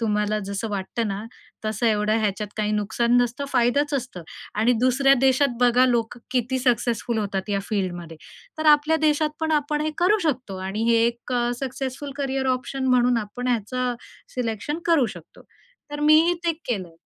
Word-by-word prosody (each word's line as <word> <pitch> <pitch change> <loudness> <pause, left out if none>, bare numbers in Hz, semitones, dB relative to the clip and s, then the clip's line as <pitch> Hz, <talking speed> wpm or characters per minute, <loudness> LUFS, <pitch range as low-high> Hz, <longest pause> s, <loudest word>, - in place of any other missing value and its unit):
तुम्हाला 210 -1 0
जसं 200 +3 -3
वाटतं 205 +3 -2
ना, 200 +1 -4 0.4
तसं 215 +2 -1
एवढं 215 0 +2
ह्याच्यात 210 0 -1
काही 215 0 0
नुकसान 220 +3 +1
नसतं, 245 +4 -3
फायदाच 280 +4 +2
असतं. 250 -10 -4 0.3
आणि 225 +4 +3
दुसऱ्या 270 +2 +4
देशात 265 -1 +3
बघा, 245 +1 +5
लोक 235 -1 0
किती 255 +1 0
सक्सेसफुल 240 -2 0
होतात 200 -1 -3
या 200 -1 0
फील्डमध्ये. 175 -5 -3 0.4
तर 310 - -1
आपल्या 300 +2 +3
देशात 300 0 +2
पण 320 0 0
आपण 295 0 0
हे 310 - -1
करू 405 +5 +4
शकतो 250 -10 -2
आणि 210 +4 -2
हे 230 - +5
एक 235 +1 -4
अ, 240 -1 +1
सक्सेसफुल 270 +1 -4
करियर 270 -1 -1
ऑप्शन 265 +1 -5
म्हणून 250 -1 +3
आपण 245 +5 -5
ह्याचं 245 +2 -1 0.4
सिलेक्शन 245 +5 -3
करू 315 -8 +4
शकतो. 165 - -15 0.5
तर 295 - -5
मीही 310 +3 +5
ते 335 - +2 0.2
केलं. 185 -8 -3
245 Hz, 165 wpm, -24 LUFS, 215-275 Hz, 0.5 s, बघा